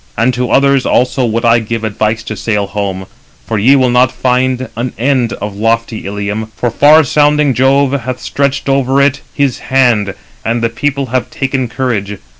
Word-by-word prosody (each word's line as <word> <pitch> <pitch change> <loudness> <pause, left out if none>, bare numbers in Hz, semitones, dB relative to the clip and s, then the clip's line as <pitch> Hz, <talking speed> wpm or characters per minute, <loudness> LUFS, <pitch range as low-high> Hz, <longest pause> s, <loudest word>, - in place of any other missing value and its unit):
And 125 +2 +2
to 125 +1 -2
others 140 -1 +3
also 125 +2 +1
would 115 +1 -1
I 115 0 +4
give 115 0 -4
advice 110 +1 -1
to 110 - -6
sail 105 -1 -1
home, 100 -1 -4 0.4
for 110 -2 -2
ye 130 +7 +5
will 130 -2 +2
not 125 +1 +3
find 130 0 0
an 120 +3 -3
end 125 -1 0
of 105 -1 -6
lofty 115 0 -1
Ilium; 105 +2 -4
for 120 0 -2
far 150 +6 +5
sounding 150 0 +2
Jove 135 +2 +2
hath 130 -2 -3
stretched 140 -1 -2
over 135 0 +1
it 140 0 +2
his 140 -4 0
hand, 120 -7 +1 0.3
and 115 +1 -1
the 115 - +2
people 140 +4 -2
have 130 - -1
taken 135 -2 -2
courage. 110 -5 -3
125 Hz, 180 wpm, -13 LUFS, 110-135 Hz, 0.4 s, ye